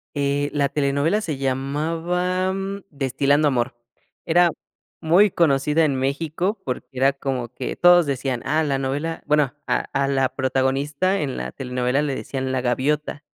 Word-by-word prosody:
Eh, 145 0 0
la 140 -1 +2
telenovela 145 +9 +1
se 155 -8 -3
llamaba 165 +8 -1 0.4
Destilando 140 +1 +1
Amor, 125 -2 0 0.5
era 175 0 +4 0.5
muy 175 +5 +4
conocida 150 0 +2
en 140 -3 0
México, 160 +9 -1
porque 125 -1 -3
era 135 +1 +2
como 135 -3 -3
que - - -5
todos 175 -1 +6
decían, 130 -3 -2
ah, 155 +2 +1
la 140 -2 0
novela, 145 +5 -3
bueno, 150 -4 +2
a - - 0
a 135 0 +1
la 135 -1 +2
protagonista 135 +8 0
en 135 -3 -3
la - - -5
telenovela 125 +1 -1
le 145 -2 -1
decían 130 0 -4
la 130 - 0
gaviota. 145 +4 -1
140 Hz, 150 wpm, -22 LUFS, 135-160 Hz, 0.5 s, todos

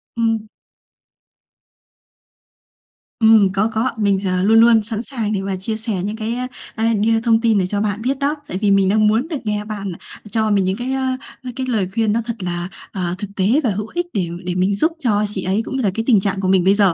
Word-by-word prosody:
Ừm. 225 -2 0 2.7
Ừm, 220 -4 +5
có, 210 +3 +1
có. 230 +4 +1
Mình 200 -2 +2
thì, 190 - 0
ờ, 185 0 0
luôn 225 +2 +5
luôn 230 -1 +6
sẵn 220 +1 -2
sàng 230 -6 -3
để 195 - -1
mà 195 -1 -2
chia 215 +4 -1
sẻ 225 -1 -3
những 210 +2 -3
cái, 225 +1 -3
a, 250 0 -3 0.3
a, 225 +1 +1
đưa 225 +2 +2
thông 230 -1 +3
tin 225 -3 +3
để 185 - +2
cho 205 +1 -1
bạn 210 0 -2
biết 265 +3 -1
đó, 285 +2 0
tại 185 - -3
vì 205 -1 +3
mình 195 -1 +4
đang 215 +1 +3
muốn 225 +8 +1
được 315 -4 -3
nghe 210 0 -2
bạn 200 -3 -5 0.4
cho 220 -1 +2
mình 200 -2 +3
những 190 +2 -1
cái, 250 +2 -3
á, 260 -1 -1 0.3
á, 250 - -5
cái 260 -1 -2
lời 205 -6 +1
khuyên 220 -2 +1
nó 230 - +1
thật 235 -1 -3
là, 175 0 -3 0.2
à, 180 -2 -2
thực 205 - -5
tế 190 - +1 0.2
và 235 - +2
hữu 210 +2 -3
ích 350 0 -1
để 185 -4 0 0.2
để 180 0 -2
mình 190 +2 +1
giúp 315 +10 +2
cho 210 -6 +2
chị 195 -3 -2
ấy, 195 +4 0
cũng 265 - -5
như 260 - -1
là 195 - +2
cái 225 - -2
tình 220 -6 +5
trạng 195 0 -1
của 185 - -1
mình 185 -2 +3
bây 195 +1 +5
giờ. 200 -4 +4
215 Hz, 250 wpm, -19 LUFS, 195-230 Hz, 2.7 s, luôn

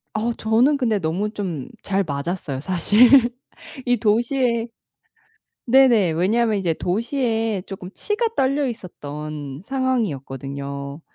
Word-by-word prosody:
어 230 +2 0
저는 235 +7 +2
근데 225 -6 +1
너무 180 +6 -1
좀 180 - -5
잘 200 0 0
맞았어요 145 -2 -3
사실. 195 - +4 0.8
이 245 0 +2
도시에 235 +1 +1 1.0
네네 240 -8 +5
왜냐면 215 +6 +2
이제 175 -4 0
도시에 225 - -1
쪼끔 185 -1 -8
치가 430 +3 -1
떨려 275 +1 +1
있었던 150 - -7
상황이었거든요. 140 - -3
205 Hz, 240 characters per minute, -22 LUFS, 160-240 Hz, 1.0 s, 네네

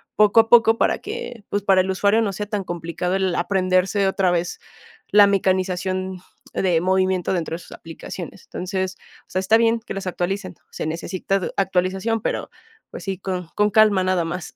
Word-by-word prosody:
poco 210 +1 +5
a 225 - -9
poco 225 -1 +6
para - - +2
que, 425 - -7
pues, 205 - -1
para 195 -2 +4
el 190 +1 -1
usuario 200 +4 +2
no 200 - -2
sea 205 +2 -4
tan 210 -2 -2
complicado 175 +1 -3
el 190 -2 0
aprenderse 185 +2 +1
otra 190 -1 +1
vez, 175 0 -2 0.5
la 205 -1 +7
mecanización 185 -1 0 0.4
de 175 -4 +2
movimiento 185 0 +1
dentro 170 -3 -2
de 170 - -7
sus - - -13
aplicaciones. 165 +3 -9
Entonces, 185 0 -4 0.3
o - - -23
sea, 185 - 0
está 190 +4 +4
bien 230 0 +2
que 235 - -7
las 195 -1 -5
actualicen. 185 +1 -3 0.2
Se - - -4
necesita 185 +4 -2 0.2
actualización, 190 +4 0
pero, - - -2 0.4
pues, - - -8
sí, 190 -2 -3
con 185 -3 -4
con 210 0 +3
calma 210 -3 +5
nada 185 -2 +1
más. 170 0 -5
190 Hz, 180 wpm, -22 LUFS, 180-205 Hz, 0.5 s, la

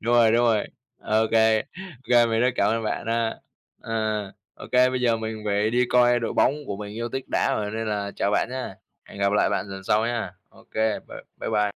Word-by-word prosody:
đúng 120 +2 +1
rồi, 115 -2 +6
đúng 120 +1 +3
rồi, 110 -3 +2 0.3
ô 110 +1 +1
kê, 110 -1 +4
ô - - -2 0.5
kê 120 -1 +6
mình 115 0 0
rất 125 - +4
cảm 100 +1 +2
ơn 115 0 -1
bạn 110 - -3
ha, 115 0 -1 0.4
ờ, 110 -3 -2 0.2
ô - - -10
kê, 125 0 +5
bây 130 - -2
giờ 120 -2 +2
mình 110 -1 -5
phải 105 +1 +1
đi 125 +1 +2
coi 120 -1 +4
đội 115 - -2
bóng 140 - +3
của 100 - -4
mình 105 0 -7
yêu 115 +1 -3
thích 135 +2 -4
đá - - +1
rồi 105 -1 -2
nên 110 +1 -3
là 100 -1 -2
chào 100 - 0
bạn 105 - +1
nhá, 130 0 -5 0.3
hẹn - - -13
gặp 100 0 +1
lại 105 - +3
bạn - - -1
lần 95 0 -8
sau 110 +4 +2
nhá. 120 -1 -2 0.2
Ô - - -20
kê, 110 -1 +1
bye - - -9 0.2
bye - - -3
bye. 105 -1 +2
110 Hz, 245 wpm, -24 LUFS, 105-120 Hz, 0.5 s, rồi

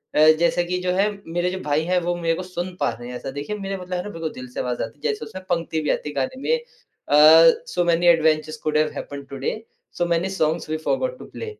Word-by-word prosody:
अ, - - +3 0.2
जैसे 170 +1 +2
कि 180 +1 -1
जो 180 0 0
है 200 +2 +3 0.2
मेरे 175 +1 0
जो 190 - -4
भाई 150 +1 +1
हैं 180 0 +2
वो 175 +1 -1
मेरे 165 -1 0
को 185 - -5
सुन 180 0 -5
पा - - +2
रहे 120 +2 -9
हैं। 125 - -6
ऐसा 135 +2 -6
देखिए 145 +9 -4
मेरा 195 -1 -4
मतलब 180 0 -7
है 180 - -3
ना - - -6
बिल्कुल 165 -4 -4
दिल 125 0 -8
से - - -5
आवाज़ 125 -1 -2
आती - - -8
है - - -29
जैसे 430 - -6
उसमे 185 - -8
पंक्ति 165 -2 -1
भी 150 - -2
आती 150 - -2
है 150 - -9
गाने 140 - -2
में 475 - +2
अ, 475 - -12 1.0
"so 180 - 0
many 170 +1 +2
adventures 155 -2 +3
could 155 0 +1
have 155 0 +2
happened 140 -1 -7
today 135 0 -3 0.4
so 175 - +1
many 170 +2 0
songs 160 -4 -1
we 155 - -1
forgot - - 0
to - - -9
play", - - -8
170 Hz, 265 wpm, -23 LUFS, 155-180 Hz, 1.0 s, अ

